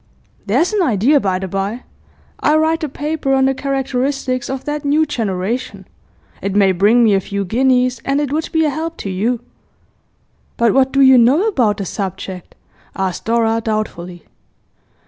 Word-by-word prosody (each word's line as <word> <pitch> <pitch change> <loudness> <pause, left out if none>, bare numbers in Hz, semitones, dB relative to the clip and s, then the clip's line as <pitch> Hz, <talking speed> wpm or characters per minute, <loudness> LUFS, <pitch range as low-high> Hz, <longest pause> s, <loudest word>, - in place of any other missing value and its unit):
There's 280 - +1
an 415 - +1
idea, 260 - +3
by 190 -6 -1
the 190 +1 -5
bye. 195 +6 -3 0.6
I'll 300 +1 +3
write 320 +1 +1
a 305 - -2
paper 290 -1 -2
on 265 0 +3
the 270 - +2
characteristics 270 -1 -2
of 265 0 -5
that 295 0 -3
new 295 +2 +2
generation; 225 -3 -3 0.5
it 195 0 -3
may 195 -2 +4
bring 210 +6 +3
me 215 -3 +4
a 195 - +3
few 200 +1 -4
guineas, 250 +3 +1
and 275 +1 0
it 290 -2 -2
would 315 +1 -2
be 320 -2 +2
a 300 - +1
help 325 +3 -4
to 195 - -2
you.' 225 +6 -1 1.2
'But 235 -2 +3
what 265 0 +3
do 275 - +2
you 265 -2 +7
know 275 - +4
about 240 - +1
the 195 - -4
subject?' 190 -1 -6 0.4
asked 190 -2 -3
Dora 230 0 +1
doubtfully. 180 -6 -4
250 Hz, 170 wpm, -17 LUFS, 200-280 Hz, 1.2 s, you